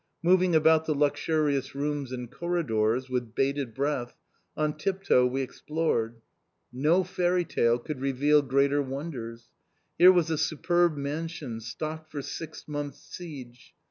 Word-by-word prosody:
Moving 180 0 +4
about 160 0 +5
the 155 - 0
luxurious 145 -2 0
rooms 145 -2 -2
and 125 -2 -6
corridors, 130 -9 0
with 125 -3 -3
bated 135 -4 -1
breath, 135 -3 -2 0.4
on 150 -1 0
tip 195 +4 -2
toe 125 -8 +4
we 135 +2 -1
explored. 125 -6 -2 0.5
No 155 +9 +3
fairy 180 0 0
tale 120 -6 +2
could 130 +2 -6
reveal 140 +2 +3
greater 140 +1 +2
wonders. 130 -5 -6 0.5
Here 180 +2 +10
was 175 -3 +2
a 155 - 0
superb 170 +1 +1
mansion 145 -3 -4
stocked 155 +7 -6
for 145 -2 -5
six 160 +2 -7
months' 145 -1 -5
siege! 130 -8 -10
145 Hz, 140 wpm, -28 LUFS, 130-160 Hz, 0.5 s, Here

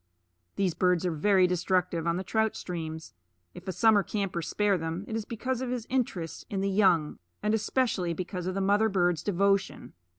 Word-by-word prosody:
These 190 -4 +1
birds 180 0 +1
are 180 - +1
very 185 +4 +3
destructive 180 -1 0
on 170 +1 +1
the 185 - -3
trout 220 +3 0
streams; 160 -3 -6 0.4
if 180 - -12
a - - -1
summer 215 +3 +4
camper 195 -4 -3
spare 205 +4 +1
them, 165 +3 -4
it 220 - -4
is 225 -2 -3
because 250 +3 -3
of 260 - -3
his 245 -2 -3
interest 195 -11 -2
in 195 -2 -2
the 195 0 0
young, 185 -6 +2 0.2
and 210 - +1
especially 220 -5 0
because 180 0 -4
of 185 - -2
the 195 - -1
mother 205 +3 +3
bird's 175 -5 +1
devotion. 200 0 0
190 Hz, 190 wpm, -28 LUFS, 175-210 Hz, 0.4 s, summer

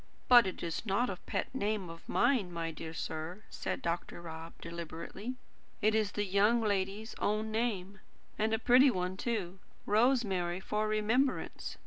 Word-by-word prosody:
"But 240 -4 +8
it 185 - -5
is 170 -1 -2
not 225 +3 +1
a 185 - -5
pet - - -2
name 210 -6 -1
of 165 0 -11
mine, 240 -7 +2
my 165 -1 -3
dear 160 +1 -7
sir," 165 +5 -5
said - - -4
Dr. 170 0 -2
Rob 165 -1 -8
deliberately. 170 +8 -6 0.4
"It 215 +1 +3
is 215 -2 +1
the 205 - 0
young 205 +5 +4
lady's 205 +1 -1
own 215 +1 0
name, 205 -4 -1 0.4
and 220 +1 +1
a 225 - +3
pretty 250 +4 +6
one, 185 -4 -1
too. 195 -4 -3 0.3
'Rosemary 205 -6 +2
for 210 +2 -1
remembrance.' 220 +6 0
205 Hz, 155 wpm, -32 LUFS, 175-220 Hz, 0.4 s, But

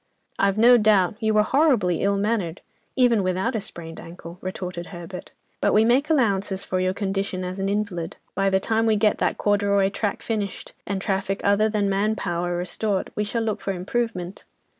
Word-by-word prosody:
"I've 195 0 +2
no 240 +2 +7
doubt; 205 -3 +3
you 220 -1 +1
were 210 - +5
horribly 240 - +2
ill 200 0 +2
mannered, 200 -5 -1 0.3
even 245 -5 +4
without 185 +6 -1
a 220 - -1
sprained 165 -4 -8
ankle," 170 +1 -10
retorted 180 -2 -5
Herbert, 175 0 -8 0.3
"but - - +2
we 215 +1 +5
make 260 +6 +3
allowances 200 -9 +1
for 185 - -2
your 185 0 0
condition 195 -2 -2
as 185 +2 -5
an 195 0 -1
invalid. 200 -5 -2 0.2
By 195 0 +1
the 190 0 +2
time 225 +3 0
we 220 - +4
get 210 0 +2
that - - 0
corduroy 200 -1 +2
track 205 +1 -3
finished, 210 -4 -4
and 195 -1 -1
traffic 195 0 -1
other 205 +2 +3
than 210 -2 0
'man 200 +2 +1
power' 175 -3 -2
restored, 190 +3 -2
we 210 - 0
shall 225 +2 -2
look 220 -2 -2
for 195 - -2
improvement." 190 -1 -3
200 Hz, 185 wpm, -24 LUFS, 185-215 Hz, 0.3 s, no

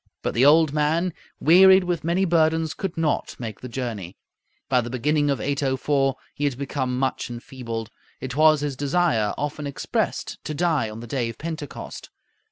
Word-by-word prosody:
But - - -1
the 130 +4 +5
old 155 0 +5
man, 160 +4 +1 0.3
wearied 190 +4 +7
with 175 -2 -2
many 175 +4 +1
burdens, 160 -2 +2
could 190 -4 -5
not 160 -2 -1
make 110 -4 -6
the 125 - -7
journey. 115 -8 -5 0.5
By 125 -2 +3
the 120 - -6
beginning 145 +4 +1
of 140 -4 0
804 135 0 0 0.2
he 145 - -2
had 135 -4 -1
become 130 -2 -2
much 130 -1 -1
enfeebled. 120 -2 -6 0.3
It 130 -1 -5
was 155 0 +5
his 145 -2 -2
desire, 145 -6 +1
often 145 0 -3
expressed, 140 - -3
to 155 - -4
die 160 -8 +1
on 110 +1 -8
the - - -7
day 120 -1 -2
of 115 - -8
Pentecost. 155 -3 -7
145 Hz, 175 wpm, -24 LUFS, 125-160 Hz, 0.5 s, wearied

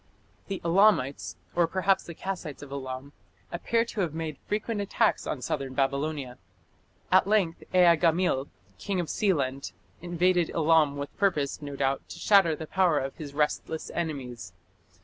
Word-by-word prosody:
The 195 -2 -3
Elamites, 170 -6 +3 0.2
or 170 -1 +3
perhaps 190 +2 +1
the 170 - -8
Kassites 175 -7 -5
of 140 - -11
Elam, 135 0 -6 0.4
appear 230 +6 0
to 225 -3 -4
have 165 -4 -2
made 160 -3 -4
frequent 215 0 -2
attacks 210 +3 +1
on 130 - -3
southern 135 0 -3
Babylonia. 140 -1 -1 0.7
At - - +5
length 200 -6 +1
Ea 180 -2 +6
gamil, 165 -4 +2 0.3
king 195 -3 -2
of 170 - -2
Sealand, 140 -9 0 0.3
invaded 175 0 +1
Elam 160 -3 +3
with 140 0 -6
purpose, 155 -8 0
no 145 -1 -6
doubt, 135 0 0
to - - -8
shatter 195 -6 +4
the 160 - -7
power 180 -2 +2
of 135 0 -2
his 145 -2 -8
restless 155 +1 -1
enemies. 125 - -4
160 Hz, 150 wpm, -28 LUFS, 140-185 Hz, 0.7 s, Ea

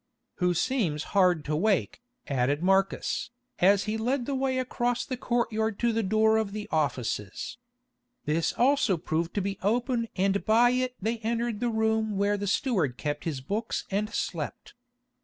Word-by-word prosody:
"Who 180 -1 +1
seems 175 - 0
hard 180 -6 +3
to 150 - -1
wake," 200 +7 +1 0.3
added 140 +3 0
Marcus, 195 +1 +1 0.3
as 195 +2 +5
he 215 +1 -2
led 245 +3 0
the 280 - -2
way 265 -1 0
across 245 -1 -1
the 260 - -3
courtyard 225 -3 -1
to 235 -1 +1
the 225 - +1
door 220 +2 +3
of 215 -2 -1
the 210 0 -5
offices. 130 - -2 0.7
This 155 +2 +1
also 250 -6 +3
proved 165 +1 -2
to 205 - +1
be 195 0 -3
open 230 +3 0
and 195 +1 +1
by 235 +3 +5
it 255 0 -1
they 225 +3 -2
entered 230 0 -1
the 240 0 0
room 220 -2 0
where 200 +1 +2
the 205 0 -3
steward 190 - 0
kept 145 0 -3
his 150 -5 -3
books 210 - -3
and 210 +2 -1
slept. - - -4
215 Hz, 165 wpm, -28 LUFS, 180-235 Hz, 0.7 s, as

